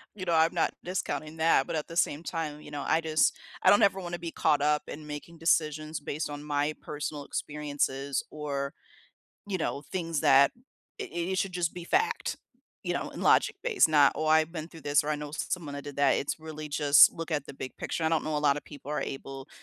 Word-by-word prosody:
you 195 - -6
know, 175 -2 0
I'm 160 0 +4
not - - +1
discounting 155 -4 -3
that, 160 -4 +3
but - - -3
at 155 - -2
the 165 - -6
same 155 -2 +1
time, 155 -3 -4
you - - -12
know, 145 -1 -4
I 160 - +3
just 155 -1 +2 0.3
I - - +7
don't 205 - +6
ever 195 -1 +3
wanna 175 -2 -4
be 170 0 -5
caught 150 -3 +2
up 150 0 +2
in 155 +1 -8
making 150 +3 -8
decisions 155 -1 +1
based 150 +1 -4
on 145 0 -6
my 145 0 0
personal 145 -1 -5
experiences 145 -2 -2
or, 140 -2 -3 0.8
you 195 - 0
know, 145 -3 -2
things 165 -5 -2
that 140 -2 +6 0.5
i - - -2
i - - -7 0.3
it 190 - 0
should 195 - 0
just 175 -2 -1
be 175 - -6
fact, 395 - 0 0.5
you - - 0
know, - - -3
and - - -7
logic-based 455 - +3
not, 145 -3 +5
"Oh, 155 - -2
I've 155 +1 +4
been 160 -2 -5
through 165 -2 -13
this, 145 +1 +3
or 145 - -5
I 150 - +1
know 145 0 -7
someone 155 -2 -3
that 140 - -6
did 145 -1 -8
that." 140 -1 +4
It's 140 - -2
really 155 -1 -7
just 145 0 +6
look 165 0 -6
at 145 -3 -1
the - - -9
big 130 -1 -7
picture. 165 - -3
I - - +4
don't 165 -1 +2
know 155 -1 -1
a - - +2
lotta 140 +1 +2
people 145 -1 -11
are - - -1
able 135 +1 -7
155 Hz, 230 wpm, -29 LUFS, 145-165 Hz, 0.8 s, I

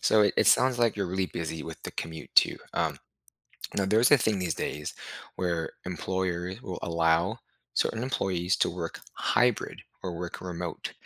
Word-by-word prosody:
So 110 - +5
it 105 - +3
it - - +4
sounds 130 -1 +5
like 115 -3 +3
you're 100 - 0
really 95 +1 0
busy 80 -2 -4
with 80 -1 -8
the - - -5
commute 80 -1 -6
too. - - +6 0.2
Um, - - +1 0.8
now 100 - +2
there's 110 +6 +5
a 145 - +8
thing 110 -4 +1
these 90 -3 -1
days 75 0 -3 0.4
where 85 -3 -1 0.2
employers 90 +2 -2
will 90 -8 -5
allow 85 0 +2 0.4
certain 110 - +1
employees 95 -8 0
to - - +3
work 85 -1 -5
hybrid 120 -3 +1 0.2
or 90 - -3
work 90 0 -5
remote. 90 -2 -5
90 Hz, 170 wpm, -28 LUFS, 85-105 Hz, 0.8 s, a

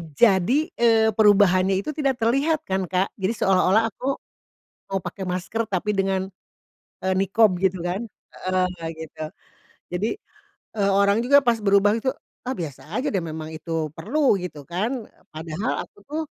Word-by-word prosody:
jadi, 225 +4 +4 0.2
eee, 225 -2 +5
perubahannya 195 -3 +4
itu 305 - -3
tidak 275 -4 0
terlihat 285 +7 +2
kan, 190 - -2
Kak. 185 +2 0
Jadi 190 +4 0
seolah-olah 195 +4 +3
aku 265 +6 -2 0.7
mau 195 - 0
pakai 180 +2 -6
masker 195 +5 -2
tapi 205 +2 0
dengan, 195 -1 0 0.8
eee, 190 - +2
niqab 195 +1 +3
gitu 190 -1 +2
kan 185 +5 -2 0.5
heeh, 185 0 +2 0.3
gitu. 160 -1 -8 0.7
Jadi, 195 +6 -1 0.7
eee, 200 -2 +2
orang 200 +3 +3
juga 280 +3 +6
pas 240 -2 +3
berubah 200 +1 +4
gitu, 260 +3 0 0.4
"Ah 260 - 0
biasa 160 - -7
aja 275 +5 -1
deh, 195 - +1
memang 155 -1 -6
itu 160 0 -3
perlu 240 - +2
gitu 175 -5 -7
kan." 220 +8 -2 0.3
Padahal 160 +8 -3
aku - - -42
tuh 305 +2 -2
195 Hz, 150 wpm, -24 LUFS, 185-230 Hz, 0.8 s, juga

